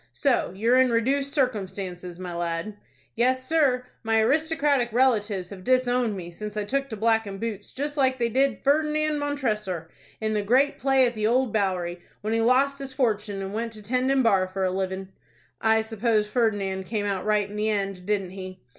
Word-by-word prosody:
So 275 -10 +1
you're 235 +6 +3
in 260 -1 +5
reduced 270 +5 +1
circumstances, 190 - -2
my 180 -1 -6
lad?" 170 +4 -3 0.4
"Yes, 255 +2 +1
sir; 270 -6 +2 0.2
my 225 -1 +2
aristocratic 285 -1 +2
relatives 215 -7 +1
have 190 -2 -10
disowned 245 -3 +2
me 175 -1 -7
since 210 +4 -7
I 210 - 0
took 275 +6 -1
to 220 - -5
blackin' 220 -2 +1
boots, 210 -1 -5
just 290 +2 -4
like 260 -2 +2
they 235 -2 +1
did 270 +4 +1
Ferdinand 305 +1 +2
Montressor, 215 - -2 0.3
in 220 0 -1
the 210 - +1
great 255 +7 +2
play 270 -1 +4
at 240 - 0
the 215 -1 0
Old 250 0 +2
Bowery, 180 -4 -1 0.2
when 215 +1 -2
he 225 - +2
lost 270 +4 +3
his 275 -1 -6
fortun' 210 -6 0
and 195 +1 -5
went 230 +1 -3
to 215 -1 -11
tending 255 +4 +1
bar 195 -5 +3
for 190 +1 -3
a 185 - +1
livin'." 190 0 -3 0.5
"I 220 0 +4
suppose 220 -1 +1
Ferdinand 205 -4 0
came 210 0 -2
out 195 -2 -1
right 210 -1 +1
in 205 - -10
the 210 +1 0
end, 195 -3 -2
didn't 195 -3 0
he?" 185 -3 -9
220 Hz, 190 wpm, -25 LUFS, 195-260 Hz, 0.5 s, in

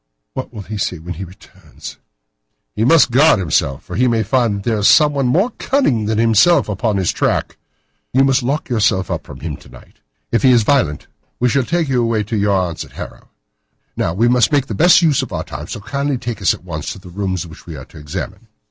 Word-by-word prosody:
What 130 - -6
will 110 -4 -8
he 105 +1 -6
say 90 - -2
when 85 +3 -7
he 90 +4 -7
returns?" 95 +2 -13 0.8
"He 110 - 0
must 145 0 +5
guard 145 +4 +5
himself, 75 -7 -1
for - - -8
he 125 +2 +2
may 115 -2 +1
find 115 0 +1
that 100 - -6
there 110 -2 +1
is 105 - +3
someone 145 -3 +4
more 190 - +2
cunning 135 - +1
than 110 0 0
himself 115 - +4
upon 105 0 -1
his 95 -3 +1
track. - - -1 0.6
You 135 +2 +3
must 135 0 +2
lock 140 +5 -2
yourself 105 -6 0
up - - -4
from 65 - -11
him 75 -1 -4
to - - -18
night. - - -17 0.3
If 115 - +1
he 130 - +5
is 115 -2 +4
violent, 100 - +1 0.3
we 125 - +2
shall 140 +2 +2
take 170 +1 0
you 130 -2 +1
away 115 -2 0
to 110 +3 -4
your 100 -1 +2
aunt's 85 -3 -3
at - - -16
Harrow. - - -10 0.7
Now, 80 - -1
we 115 +5 +2
must 120 -1 +3
make 145 -3 +2
the 115 - -6
best 175 - +5
use 155 -5 +3
of - - -6
our - - -3
time, 75 +4 -8
so 110 - -6
kindly 140 +7 -2
take 120 -3 -6
us 95 - +3
at - - -17
once 80 -4 -5
to - - -12
the 90 -1 -13
rooms 95 -2 -3
which 80 0 -14
we 80 - -7
are 65 -3 -9
to - - -14
examine." 75 -1 -7
110 Hz, 235 wpm, -17 LUFS, 95-130 Hz, 0.8 s, must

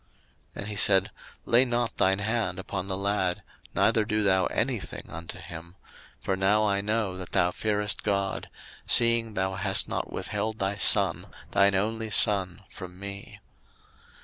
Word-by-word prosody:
01:022:012 - - -37 0.5
And 100 - -6
he 105 - -5
said, 95 -2 +3 0.3
Lay 120 +2 +5
not 120 -3 -2
thine 95 +1 +3
hand 105 -3 -2
upon 95 0 -5
the 95 -1 -3
lad, 100 -2 -1 0.3
neither 110 - +3
do 105 0 -1
thou 95 -2 +3
any - - -1
thing - - -7
unto 85 +2 -7
him: 85 0 -10 0.4
for 95 - -1
now 100 +3 +2
I 100 -1 +1
know 105 -2 -1
that 90 - -9
thou 90 0 +3
fearest 105 +1 -1
God, 100 -2 -1 0.4
seeing 115 -2 +3
thou 95 0 -1
hast 95 +1 +1
not - - -4
withheld 110 0 -3
thy 100 0 -1
son, 95 - +3 0.2
thine 100 0 +4
only 110 +3 -1
son 100 -2 +2
from 90 -1 -11
me. 100 0 -7
100 Hz, 160 wpm, -27 LUFS, 95-105 Hz, 0.5 s, Lay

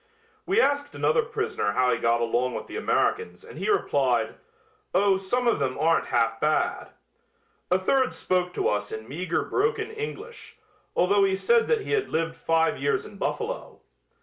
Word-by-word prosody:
We 390 +4 +3
asked 285 -6 +1
another 480 - +2
prisoner 435 - -2
how 125 +3 +2
he - - 0
got 115 0 +2
along 120 +2 0
with - - -5
the - - -10
Americans 450 +2 0
and - - -11
he - - -2
replied: 410 - +1 0.6
"Oh, 195 0 +4
some 240 +6 -1
of 235 - +2
them 130 -2 -1
aren't 165 +1 +2
half 115 -1 +1
bad." 155 +3 0 0.8
A 180 - +4
third 260 +8 +2
spoke 180 -1 -1
to - - 0
us 105 0 -1
in 110 0 -6
meager 165 +5 -2
broken 440 +1 -1
English, 445 +1 -7 0.4
although 200 +3 +3
he 190 -1 +2
said 465 - +3
that 465 -2 +2
he - - -6
had 430 -2 +1
lived 165 0 -1
five 165 0 +1
years 435 -1 0
in - - -12
Buffalo. - - -4
195 Hz, 175 wpm, -26 LUFS, -, 0.8 s, Oh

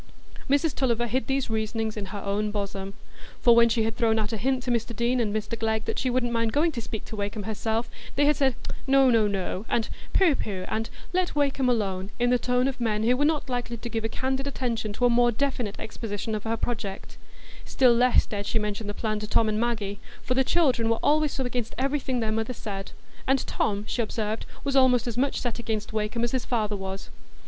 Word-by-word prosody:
Mrs 285 +2 +3
Tulliver 240 -3 +1
hid 240 0 -1
these 270 -1 0
reasonings 220 0 -1
in 205 -2 -4
her 200 +1 -6
own 205 +1 0
bosom; 200 -1 -4 0.4
for 235 -1 +6
when 235 0 +6
she 225 -1 +2
had 225 0 -1
thrown 225 -2 +2
out 215 +1 -1
a - - -1
hint 255 +4 0
to 250 - -1
Mr 235 0 -1
Deane 240 +3 +1
and 220 -3 +1
Mr 215 +1 -2
Glegg 220 -1 0
that - - -2
she 260 - 0
wouldn't 245 -1 +1
mind 230 -1 +1
going 320 +3 +3
to 245 -6 -4
speak 220 -1 -6
to - - -7
Wakem 205 +1 -3
herself, 220 +2 -1 0.3
they 290 - +3
had 295 +1 +4
said, 265 -3 +2 0.3
"No, 270 -1 +6
no, 225 -3 +4
no," 195 -1 -2
and 225 - +1 0.2
"Pooh, 365 -6 +5
pooh," 195 -8 -3
and 225 +1 -2 0.2
"Let 365 -3 +1
Wakem 280 -3 +2
alone," 195 -5 0
in 245 0 +2
the 250 - +4
tone 250 +1 +2
of 265 -2 -4
men 215 -2 +1
who 240 +3 +4
were 290 +3 +2
not 305 -2 +1
likely 245 -2 -3
to 235 +1 -6
give 225 -1 -2
a 225 - -1
candid 265 +3 -2
attention 235 -6 -2
to 245 - +1
a - - +5
more 240 0 +4
definite 245 -4 -2
exposition 220 -1 -4
of 215 0 -3
her 225 +1 0
project; 215 -5 -4 0.5
still 255 -2 +4
less 245 +1 +4
dared 205 -1 -4
she - - +1
mention 210 0 -2
the 205 - -4
plan 215 -2 -1
to 210 - -5
Tom 220 +1 +3
and 215 0 0
Maggie, 220 -4 -1 0.2
for 255 - 0
"the 265 +1 +3
children 255 -7 +2
were 230 - +2
always 305 0 +3
so 265 - -2
against 245 -2 -3
everything 265 -2 0
their 220 -1 0
mother 225 +3 -1
said"; 200 -4 -6 0.4
and 270 0 +2
Tom, 205 -1 -1
she 240 - 0
observed, 220 -1 -2 0.2
was 280 -2 -1
almost 255 -2 +5
as 240 -3 -3
much 270 +3 +1
set 245 -2 -3
against 220 -2 -3
Wakem 220 +2 -1
as 235 - +1
his 260 -2 0
father 215 -4 0
was. 195 0 -6
230 Hz, 230 wpm, -26 LUFS, 215-255 Hz, 0.5 s, for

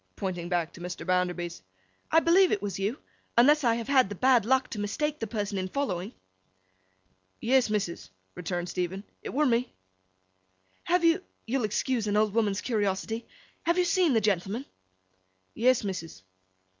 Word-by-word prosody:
pointing 180 -3 -4
back 175 -3 -1
to - - -12
Mr. 180 -1 -6
Bounderby's. 180 - -1 0.5
'I 325 - +5
believe 360 +3 +5
it - - +1
was 195 -2 -3
you, 205 +7 -1 0.4
unless 295 +5 +6
I 230 -2 +3
have 230 -1 -4
had 260 -7 +4
the 205 - -5
bad 250 0 +4
luck 260 0 +3
to 215 - -4
mistake 295 +9 -2
the 225 - -3
person 205 -2 -2
in 185 - -2
following?' 190 -5 -2 1.3
'Yes, 255 0 +3
missus,' 200 -5 -2 0.2
returned 175 0 -3
Stephen, 180 +2 -3 0.2
'it - - -6
were 300 +3 +1
me.' 245 -1 +1 1.1
'Have 355 0 +2
you—you'll 330 - 0
excuse 225 +2 -1
an 205 0 +1
old 210 -1 +2
woman's 210 -3 +1
curiosity—have 225 - -2
you 360 - +3
seen 360 -5 +3
the 225 - +3
gentleman?' 205 +5 0 0.9
'Yes, 255 0 +3
missus. 165 - -5
215 Hz, 155 wpm, -28 LUFS, 190-260 Hz, 1.3 s, unless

